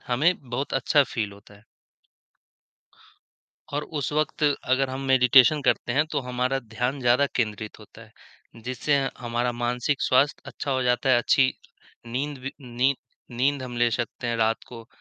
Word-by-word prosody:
हमें 150 +9 +2 0.2
बहुत 135 +4 -3
अच्छा 145 +2 +3
फ़ील 110 -6 -3
होता 100 +1 -16
है। 105 +2 -20 2.1
और 145 - -1 0.2
उस 145 - -2
वक़्त 155 0 -1
अगर 135 -2 +1
हम 130 - -4
मेडिटेशन 130 +2 +6
करते 120 - +1
हैं, 150 +3 +2
तो 150 - -2
हमारा 125 +2 0
ध्यान 125 +3 -3
ज़्यादा 125 +3 +3
केंद्रित 110 -2 -2
होता 110 +1 -15
है। 110 0 -18 0.5
जिससे 130 +3 0
अ, 135 - -1
हमारा 120 0 -1
मानसिक 120 +3 -1
स्वास्थ्य 140 +3 +2
अच्छा 140 - -5
हो 130 -1 +1
जाता 125 +1 +1
है, 120 - +6
अच्छी 130 +2 +3 0.5
नींद 135 +4 -3
वी 135 +2 -6
नी 125 +2 0 0.4
नींद 140 +1 +1
हम 120 -1 -7
ले 120 0 +3
सकते 120 +1 -4
हैं 120 -1 -1
रात 115 0 0
को, 115 -2 -10
125 Hz, 165 wpm, -25 LUFS, 120-135 Hz, 2.1 s, मेडिटेशन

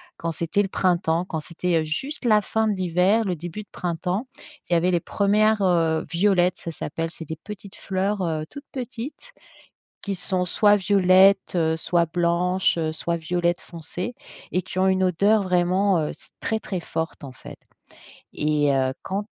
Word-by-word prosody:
quand 165 - -3
c'était 170 +6 0
le 195 - -4
printemps, 175 -2 +1
quand 160 -4 -4
c'était, 170 0 -1
heu, - - -2
juste 265 - -4
la 215 -3 +5
fin 220 +1 0
de 210 - +2
l'hiver, 185 +4 +2
le 185 -3 -1
début 175 +6 -7
de 200 - -29
printemps, 180 - -2 0.4
il - - +1
y - - +5
avait 180 +2 +2
les 175 - +2
1res, 210 +1 +2
heu, 165 -4 +2
violettes, 180 0 +3
ça 170 - -6
s'appelle 165 +1 -4
c'est 165 - -7
des 160 - -4
petites 200 +3 -10
fleurs, 195 +2 -2
heu, 160 -3 -1
toutes 285 0 -10
petites 260 - -7 0.7
qui 200 - -2
sont 180 0 -1
soit 205 +3 +4
violettes, 195 -1 +4 0.2
soit 170 +1 +1
blanches, 175 +2 +1
soit 170 +1 -2
violettes 175 +1 0
foncées 175 +7 -7 0.4
et 185 - +2
qui 185 +1 -5
ont 190 - +4
une 190 0 +2
odeur 200 +4 +3
vraiment, 185 +1 +2
heu, 150 - -1
c'est - - -11
très, 220 - -1
très 185 - -4
forte 160 -2 -4
en 135 - -8
fait - - -11 0.8
et 150 -1 +1
heu, 130 -1 +1
quand 200 +2 -3
180 Hz, 175 wpm, -24 LUFS, 170-200 Hz, 0.8 s, la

